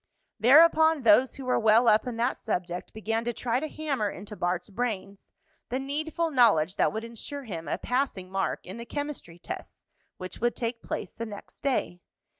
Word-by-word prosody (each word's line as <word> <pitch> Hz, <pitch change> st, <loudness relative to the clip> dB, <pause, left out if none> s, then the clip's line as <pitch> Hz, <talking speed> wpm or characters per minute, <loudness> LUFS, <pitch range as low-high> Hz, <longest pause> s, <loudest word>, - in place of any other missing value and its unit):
Thereupon 315 Hz, +4 st, +6 dB
those 235 Hz, +4 st, +5 dB
who 270 Hz, -, -8 dB
were 250 Hz, -, +2 dB
well 220 Hz, +2 st, +5 dB
up 215 Hz, +3 st, +4 dB
in 240 Hz, -2 st, -4 dB
that 240 Hz, +2 st, 0 dB
subject 180 Hz, -5 st, -3 dB
began 225 Hz, +1 st, -2 dB
to 240 Hz, 0 st, -2 dB
try 245 Hz, +1 st, -1 dB
to 310 Hz, -, -3 dB
hammer 285 Hz, -9 st, -2 dB
into 205 Hz, +3 st, -8 dB
Bart's 180 Hz, +2 st, -2 dB
brains 200 Hz, -3 st, -4 dB, 0.4 s
the 250 Hz, -, -1 dB
needful 310 Hz, +4 st, -2 dB
knowledge 205 Hz, -, +4 dB
that -, -, +3 dB
would 220 Hz, +1 st, -4 dB
insure 235 Hz, +5 st, -6 dB
him 170 Hz, -9 st, -6 dB
a -, -, -1 dB
passing 250 Hz, -8 st, -2 dB
mark 195 Hz, 0 st, -2 dB
in 190 Hz, +4 st, -8 dB
the 235 Hz, -, -7 dB
chemistry 290 Hz, -, -5 dB
tests 175 Hz, -, -8 dB, 0.3 s
which 185 Hz, +3 st, -8 dB
would 240 Hz, 0 st, +1 dB
take 230 Hz, 0 st, -3 dB
place -, -, -5 dB
the 230 Hz, -, -6 dB
next 205 Hz, -1 st, -11 dB
day. 250 Hz, -10 st, -1 dB
230 Hz, 185 wpm, -28 LUFS, 200-265 Hz, 0.4 s, Thereupon